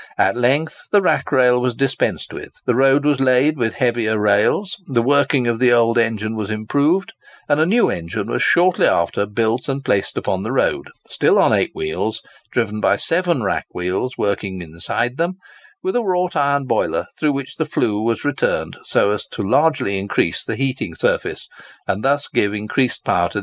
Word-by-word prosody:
At - - +2
length 135 +6 0
the 205 - +6
rack 190 - 0
rail 125 -1 +4
was 125 -1 -1
dispensed 135 0 -1
with. - - -9
The 125 - +2
road 135 +3 +3
was 145 -2 +2
laid 135 +3 +3
with 115 -2 -1
heavier 120 -4 0
rails; 105 - +2
the 120 -4 +1
working 140 -1 +2
of 120 -1 0
the 125 -1 +4
old 120 0 +3
engine 110 -1 -1
was 105 -2 -4
improved; 145 - 0 0.3
and 145 0 +2
a 160 - +3
new 230 +5 +3
engine 90 +5 -4
was 115 - -2
shortly 180 +1 +3
after 85 +4 +1
built 115 +5 -1
and 135 0 -3
placed 100 - 0
upon 95 - -1
the 110 +4 -4
road, 340 - 0 0.2
still - - +2
on - - +4
eight - - +2
wheels, 390 +2 -3 0.3
driven 110 -3 -1
by - - +3
seven 170 -6 +1
rack 95 - -2
wheels 90 +8 -2
working 100 -2 -2
inside 85 - -3
them—with 370 - -5
a 245 - +2
wrought 180 -4 -1
iron 140 -1 +1
boiler - - 0
through 150 -2 +1
which 135 -1 -6
the - - 0
flue 105 -1 0
was 115 +3 -1
returned 145 -1 -1
so 100 - +2
as 105 -1 -3
largely 145 +4 +1
to 100 - -1
increase 95 -3 -1
the - - -4
heating 130 -11 -2
surface, - - -1 0.4
and 100 - -2
thus 140 +1 +1
give 100 +1 0
increased 105 +5 -1
power - - +1
to - - -13
the - - -4
engine. - - +1
125 Hz, 190 wpm, -19 LUFS, 110-145 Hz, 0.4 s, the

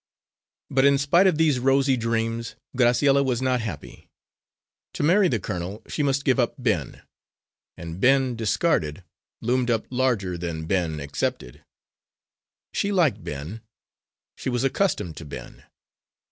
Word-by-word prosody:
But 130 0 +3
in 140 0 +5
spite 170 +8 +4
of 175 -5 +2
these 155 -5 +3
rosy 135 +1 +3
dreams, 115 -1 -2 0.2
Graciella 135 +3 +4
was 125 -3 0
not 130 -2 +1
happy. 90 -11 -8 0.8
To - - -3
marry 185 +5 +4
the 120 -9 0
colonel 90 +3 -5
she - - -3
must 140 -1 0
give 130 -1 +3
up 120 - +1
Ben; 105 - -2 0.7
and 85 +1 -7
Ben, 130 -1 +3
discarded, 100 - 0 0.4
loomed 125 +1 +1
up 115 -2 +1
larger 115 -9 0
than 80 -2 -4
Ben, 85 -3 -1
accepted. 70 -3 -4 1.1
She 200 - 0
liked 160 - +2
Ben; 75 +10 -6 0.7
she - - -4
was 120 0 -1
accustomed 135 - 0
to 80 - -8
Ben. 70 - -10
120 Hz, 135 wpm, -24 LUFS, 95-135 Hz, 1.1 s, in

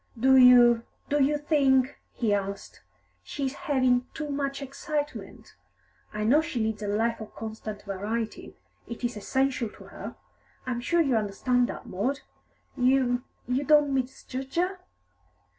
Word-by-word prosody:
"Do 265 +3 +5
you 245 -2 +7 0.3
do 290 -1 +3
you 295 +2 +2
think," 275 -3 +2 0.2
he 220 -4 0
asked, 200 0 -4 0.4
"she 275 - -4
is 265 - -2
having 255 -6 +1
too 300 -1 -4
much 275 -1 -2
excitement? 290 +2 -5 0.6
I 210 0 -3
know 270 +8 +4
she 315 -6 -4
needs 220 -1 -1
a 205 - -3
life 225 +3 0
of 215 - -10
constant 215 -1 -7
variety; 210 +3 -4 0.3
it 235 +1 -8
is 240 -1 -1
essential 260 +2 0
to - - -15
her. - - -9 0.5
I'm 245 -2 -2
sure 340 +7 +2
you 275 -6 +2
understand 240 +4 +1
that, - - -7
Maud? 250 +10 -2 0.5
You 250 -1 +2 0.3
you 255 +3 0
don't 295 -1 +4
misjudge 265 0 -4
her?" 365 +2 0
255 Hz, 145 wpm, -27 LUFS, 225-280 Hz, 0.6 s, you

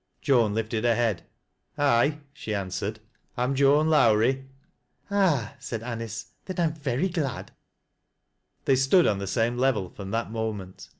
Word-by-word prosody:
Joan 115 -7 +2
lifted 110 0 -2
her 120 -1 +3
head. 115 -6 -1 0.3
" - - -51
Aye," 145 +1 +2
she 110 -8 -4
answered, 100 +2 -3 0.2
" - - -41
I'm 125 +2 +1
Joan 140 +3 +4
Lowrie." 130 -2 +3 0.4
" - - -33
Ah," 170 - +2
said 115 -2 -5
Anice, 115 -2 -5
" - - -45
then 185 - -6
I - - +3
am 160 -2 +1
very 145 +1 -1
glad." 160 -8 -3 1.1
They 135 - +4
stood 135 +7 +4
on 100 - +1
the 100 - -4
same 120 +4 0
level 120 -9 +1
from 100 -1 -8
that 115 0 -2
moment. 110 -5 -5
120 Hz, 170 wpm, -26 LUFS, 110-140 Hz, 1.1 s, Joan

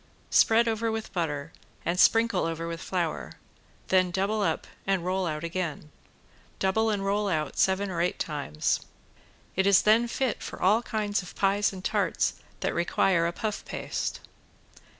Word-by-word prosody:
Spread 230 +1 +5
over 225 0 0
with 220 0 -5
butter 155 -3 -2 0.3
and 175 +2 0
sprinkle 225 -5 +4
over 165 0 -3
with 165 0 -5
flour, 175 -4 -2 0.6
then 185 -1 +4
double 195 +4 0
up 200 - 0 0.2
and 190 -3 +1
roll 185 0 0
out 155 -1 -3
again. 165 -3 -4 0.7
Double 220 +4 +1
and 200 -2 -1
roll 205 +1 +1
out 155 -4 -1
seven 190 +1 +2
or 170 -2 -1
eight 180 - 0
times. 145 - -1 0.8
It 190 +1 +2
is 200 -1 +6
then 225 +3 +4
fit 255 0 -1
for - - -7
all 210 +5 +4
kinds 210 -3 -1
of 180 - -11
pies 200 +1 +2
and 190 -1 -9
tarts - - +1 0.3
that - - 0
require 170 0 +2
a - - -1
puff 210 +4 -3
paste. - - -4
190 Hz, 160 wpm, -27 LUFS, 170-210 Hz, 0.8 s, is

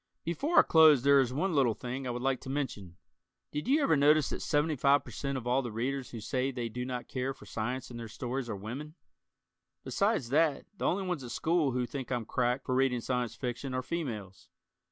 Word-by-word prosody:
Before 280 - -1
I - - +11
close 155 -5 +6
there 140 0 +6
is 130 -2 +2
one 175 +8 0
little 130 -7 +3
thing 130 +1 -5
I - - -2
would 120 0 -3
like 135 -1 0
to - - -8
mention. 105 -11 -4 0.5
Did 150 +2 -4
you 290 +3 +3
ever 160 - +4
notice 150 0 +4
that - - -2
75% 145 -2 +1
of 125 - -6
all 125 +2 +2
the 120 -3 -5
Readers 130 +4 -2
who 115 - -7
say 130 +4 -1
they 120 -3 -3
do 125 +3 -4
not 125 -1 -4
care 130 +1 -3
for - - -14
science 125 +4 -4
in 120 - -7
their 115 -1 -6
stories 125 +3 -4
are 110 - -2
women? 130 +10 -7 0.4
[?] 65 0 -58
Besides 115 - 0
that, 150 +1 +2
the - - -4
only 195 +2 +1
ones 180 -7 -3
at 120 - -7
school 160 +1 +1
who 125 0 0
think 130 0 -6
I'm 120 -3 -1
"cracked" 125 +3 0
for 130 - -1
reading 130 -1 +2
Science 125 -1 -2
Fiction 130 +1 -4
are 130 - -1
females. 110 - -5
130 Hz, 215 wpm, -31 LUFS, 120-145 Hz, 0.5 s, I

